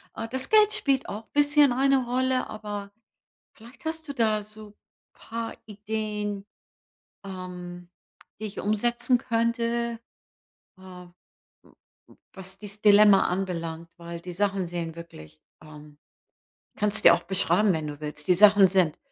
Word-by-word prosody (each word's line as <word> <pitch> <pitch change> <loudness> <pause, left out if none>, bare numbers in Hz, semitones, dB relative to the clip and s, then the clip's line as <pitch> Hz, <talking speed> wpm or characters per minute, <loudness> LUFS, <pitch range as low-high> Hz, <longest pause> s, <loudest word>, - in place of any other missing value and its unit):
Äh, 225 - -5
das 260 0 -3
Geld 430 -1 +5
spielt 275 -11 0
auch 220 +2 -7
bisschen 290 -1 +4
eine 270 0 +2
Rolle, 255 +1 0
aber 205 -2 -7 0.6
vielleicht 235 +7 -17
hast 320 -1 -4
du 280 - -5
da 215 -3 +1
so 215 0 -13 0.4
paar 230 0 -6
Ideen, 210 -1 -4 0.8
ähm, 180 -2 -8 0.5
die 220 - -5
ich 205 - -7
umsetzen 240 +4 +1
könnte. 235 0 -1 0.8
Äh, - - -18
m 180 -1 -12 1.0
m - - -20 0.2
was 190 0 -7
dies 205 0 -11
Dilemma 205 -1 +6
anbelangt, 170 -3 -4
weil 170 0 -8
die 180 0 -8
Sachen 195 -1 -1
sehen 170 -1 -5
wirklich, 75 - -12 0.2
ähm 150 -1 -14 0.8
kann‘s 210 0 +3
dir 170 - +9
auch 175 - -7
beschreiben, 195 +2 +1
wenn 155 -1 -3
du 145 0 -7
willst. 150 +1 -7
Die 180 - +5
Sachen 205 0 +7
sind 180 -5 +2
205 Hz, 140 wpm, -26 LUFS, 180-230 Hz, 1.0 s, dir